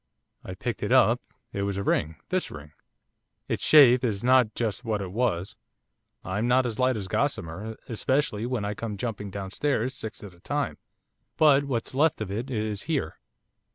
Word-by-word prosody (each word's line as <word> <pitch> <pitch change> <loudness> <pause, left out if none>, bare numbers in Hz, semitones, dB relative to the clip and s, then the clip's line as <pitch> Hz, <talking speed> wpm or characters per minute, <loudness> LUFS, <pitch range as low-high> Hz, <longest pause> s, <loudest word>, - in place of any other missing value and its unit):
I - - -7
picked - - -4
it - - -2
up, - - +5 0.3
it 100 - -2
was 100 -1 -1
a 100 - -2
ring; 80 -4 0
this 185 0 0
ring. 75 -1 -10 0.8
Its - - -2
shape 130 -4 +7
is 105 -4 -1
not 125 -3 +4
just 115 0 -2
what 110 -3 -1
it 95 -2 -5
was, 105 -3 -1 0.7
I'm 105 +6 -1
not 125 +1 +4
as 115 -3 -3
light 130 -2 +2
as 100 -3 -4
gossamer, 95 +5 -2
especially 120 -1 0
when 125 -5 -2
I 105 - -2
come 105 -1 -5
jumping 105 -3 -4
downstairs 110 +7 -1
six 110 -4 -6
at 100 -3 -9
a 85 - -20
time, 145 +7 -2 0.6
but 145 -2 +5
what's 120 -4 -3
left 150 +4 +2
of 105 -3 -4
it 115 +7 -3
is 110 -4 -2
here. 140 - -1
110 Hz, 180 wpm, -27 LUFS, 100-130 Hz, 0.8 s, shape